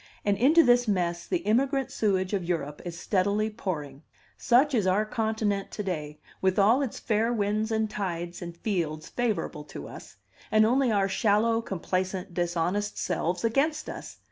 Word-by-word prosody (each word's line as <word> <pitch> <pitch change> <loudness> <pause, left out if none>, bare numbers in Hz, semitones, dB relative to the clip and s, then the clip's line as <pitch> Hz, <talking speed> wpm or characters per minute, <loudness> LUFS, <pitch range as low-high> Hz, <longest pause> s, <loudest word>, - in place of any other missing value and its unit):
And 205 -1 +3
into 295 - +5
this 245 -2 +4
mess 175 -4 -1
the 350 -2 -1
immigrant 265 +4 +1
sewage 190 -2 0
of 195 -3 0
Europe 160 -4 -3
is 175 -1 -6
steadily 205 +3 +1
pouring. 150 -10 -5 0.3
Such 265 +5 +3
is 215 -6 +2
our 200 +3 +2
continent 215 -2 -1
to 210 - -3
day, 150 -5 -4 0.2
with 190 -1 +2
all 220 +7 +5
its 265 -5 -3
fair 225 +1 0
winds 215 0 0
and 220 0 +1
tides 175 -4 -4
and 170 -1 -7
fields 165 -6 -2
favorable 215 -10 -2
to 75 - -8
us, - - -11 0.3
and 215 0 +5
only 250 +2 +3
our 200 -2 +2
shallow, 220 +3 +2
complacent, 185 -2 -3
dishonest 175 +4 -1
selves 175 +2 -1
against 280 +7 +1
us! - - -9
205 Hz, 165 wpm, -27 LUFS, 175-225 Hz, 0.3 s, into